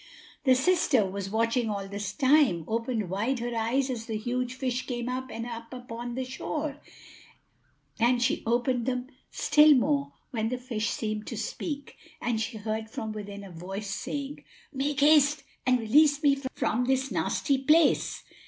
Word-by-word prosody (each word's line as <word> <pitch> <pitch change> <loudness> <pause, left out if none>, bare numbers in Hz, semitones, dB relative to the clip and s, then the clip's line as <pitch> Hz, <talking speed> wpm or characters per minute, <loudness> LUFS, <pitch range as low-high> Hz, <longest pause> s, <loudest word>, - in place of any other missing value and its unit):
The 260 -1 +6
sister, 300 -3 +3
who 190 - -5
was 195 0 -4
watching 230 +2 +1
all 200 -2 -3
this 200 0 -4
time, 265 - +3
opened 230 -2 -1
wide 225 +8 0
her 240 0 -3
eyes 235 +4 +1
as 230 -2 -5
the 220 -2 -2
huge 245 +3 -2
fish 255 -1 -2
came 240 -2 -3
up 260 +1 -3
and 230 0 -5
up 230 -1 -7
upon 240 -1 -6
the 260 0 -2
shore; 290 +3 -4 1.2
and 240 +1 +3
she 240 - +1
opened 240 +1 +1
them 250 0 -2 0.2
still 300 0 +5
more 140 - +1 0.2
when 225 -2 -1
the 250 - -2
fish 235 -3 -2
seemed 215 -1 -3
to 230 - -5
speak, 285 +5 -5 0.2
and 235 -2 -1
she 225 +1 -3
heard 220 +1 -3
from 220 -1 -4
within 205 -1 -7
a 195 - -10
voice, 195 +4 -6
saying, 285 +5 -5 0.3
"Make 280 +1 -1
haste 295 -1 +5 0.2
and 255 -1 +4
release 285 +6 +4
me 280 -1 +5 0.2
from 245 +3 0
this 265 +1 +1
nasty 280 -3 0
place." 305 +4 +3
245 Hz, 170 wpm, -28 LUFS, 220-270 Hz, 1.2 s, The